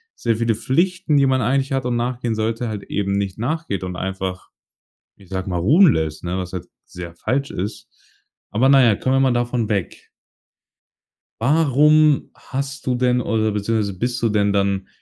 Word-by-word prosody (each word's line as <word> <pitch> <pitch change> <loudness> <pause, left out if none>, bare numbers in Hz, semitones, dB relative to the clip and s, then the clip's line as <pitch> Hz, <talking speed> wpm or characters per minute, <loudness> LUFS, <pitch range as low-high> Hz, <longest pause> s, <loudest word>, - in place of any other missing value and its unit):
sehr 115 -2 0
viele 115 -1 +1
Pflichten, 170 - +1
die 140 - +4
man 130 -1 +2
eigentlich 135 +2 0
hat 135 -2 -1
und 125 -1 0
nachgehen 120 -1 -2
sollte, 115 +2 -2
halt 105 -2 -5
eben 100 -1 -2
nicht 100 -1 -2
nachgeht 130 - -2
und 90 -1 -5
einfach- 95 0 -4 0.7
ich 95 -3 -19
sage 95 0 -4
mal- 90 - -1
ruhen 155 - +6
lässt, 80 -1 -3
ne, 90 +1 -2
was 90 -1 -5
halt 90 -3 -5 0.2
sehr 85 -1 -9
falsch 135 +9 -2
ist. 105 +4 -5 0.6
Aber 120 +5 +2
na 135 -1 +6
ja, 115 -4 +4
kommen 130 +6 -1
wir - - +3
einmal 135 -2 +3
davon 120 -2 -1
weg. 100 -5 -3 1.3
Warum 150 +2 +4
hast 135 -1 -5
du 125 - +1
denn 125 0 +2
oder 110 -1 0
beziehungsweise 105 -1 -1
bist 120 +4 -2
du 115 - +2
denn 100 -1 +1
dann 100 -1 0
115 Hz, 180 wpm, -21 LUFS, 100-135 Hz, 1.3 s, ruhen